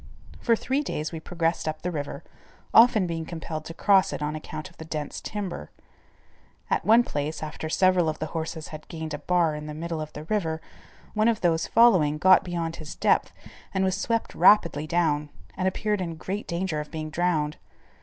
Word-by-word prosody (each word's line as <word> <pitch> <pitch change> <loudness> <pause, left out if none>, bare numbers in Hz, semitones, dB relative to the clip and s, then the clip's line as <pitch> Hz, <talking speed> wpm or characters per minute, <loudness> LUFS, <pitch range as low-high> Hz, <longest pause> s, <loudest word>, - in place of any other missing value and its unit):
For 230 - +3
three 265 +5 -1
days 155 - -3
we 165 - -5
progressed 165 0 -1
up 155 0 -3
the 180 - -1
river, 145 -3 -5 0.5
often 225 -4 +7
being 165 -2 -3
compelled 160 -1 -6
to 165 - -7
cross 195 -1 +4
it - - -4
on 150 +1 -2
account 155 +1 -6
of - - -24
the - - -8
dense 155 -2 -5
timber. 195 - -5 1.0
At - - +1
one 225 +5 +6
place, 150 -4 -3
after 155 0 -5
several 185 -1 +3
of 155 - -3
the 155 - -3
horses 160 -1 -4
had 155 -1 -9
gained 160 -2 -6
a 150 - -4
bar 170 0 +2
in 150 0 -6
the 150 - -6
middle 165 0 -4
of 155 0 -6
the 150 - -7
river, 160 -3 -1 0.5
one 215 +1 +2
of 230 -2 +1
those 165 -2 +2
following, 185 -11 +5
got 185 +3 +6
beyond 170 -2 -3
his 155 -1 -8
depth - - +2 0.4
and 190 - +2
was 190 -1 +1
swept 230 +3 -1
rapidly 170 -7 +4
down, 155 -3 +1 0.3
and 185 0 0
appeared 210 +1 0
in 170 -2 -3
great 195 +6 -5
danger 170 -2 -2
of 150 - -6
being 155 -1 -5
drowned. 155 -3 0
165 Hz, 195 wpm, -26 LUFS, 155-185 Hz, 1.0 s, often